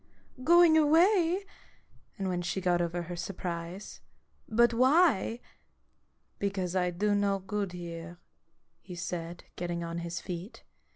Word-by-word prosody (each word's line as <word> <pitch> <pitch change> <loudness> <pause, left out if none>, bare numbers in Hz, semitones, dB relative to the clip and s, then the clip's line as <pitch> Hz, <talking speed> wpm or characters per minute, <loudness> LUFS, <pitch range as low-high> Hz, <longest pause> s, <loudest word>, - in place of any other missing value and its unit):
Going 340 +1 +6
away 340 +4 +4
I - - -21 0.4
" - - -34
And 195 -2 -2
when 180 -1 -1
she 175 +2 -2
got 175 -2 +1
over 175 0 -2
her 175 +1 -6
surprise: 175 +1 -6 0.5
"But 235 +2 +4
why? 255 - +3 0.3
" - - -44
" - - -44
Because 190 -3 -2
I 180 -1 +2
do 205 +4 0
no 200 -1 +1
good 195 0 -4
here," 170 -1 -7 0.6
he 180 - -9
said, 170 0 -5
getting 175 -1 -3
on 170 0 -4
his 170 0 -4
feet. 180 +3 -7
185 Hz, 150 wpm, -30 LUFS, 175-230 Hz, 0.6 s, Going